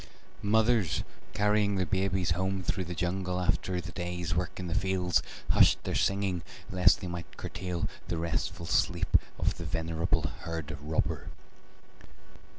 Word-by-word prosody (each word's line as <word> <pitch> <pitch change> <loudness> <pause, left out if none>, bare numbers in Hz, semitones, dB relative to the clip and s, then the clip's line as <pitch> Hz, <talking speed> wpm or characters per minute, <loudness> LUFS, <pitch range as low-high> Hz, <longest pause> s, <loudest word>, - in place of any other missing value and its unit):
Mothers 110 -6 +3 0.3
carrying 105 0 +3
their 95 -1 +1
babies 95 -1 +1
home 95 +2 0
through 95 +1 -1
the 90 +1 -5
jungle 90 +2 -1
after 90 0 0
the 90 0 -6
day's 90 -2 -3
work 90 +3 -2
in 90 - -3
the 85 - -2
fields 95 -4 +2 0.3
hushed - - +5
their - - -2
singing 95 -3 +1 0.3
lest 90 -1 +5
they 90 - -4
might 85 -1 -6
curtail 90 -2 -3 0.2
the 85 - -1
restful 85 0 -2
sleep - - +1 0.2
of - - 0
the - - -4
venerable 80 0 0 0.2
herd 80 -2 -4
robber. 75 +2 -1
90 Hz, 145 wpm, -30 LUFS, 85-95 Hz, 0.3 s, hushed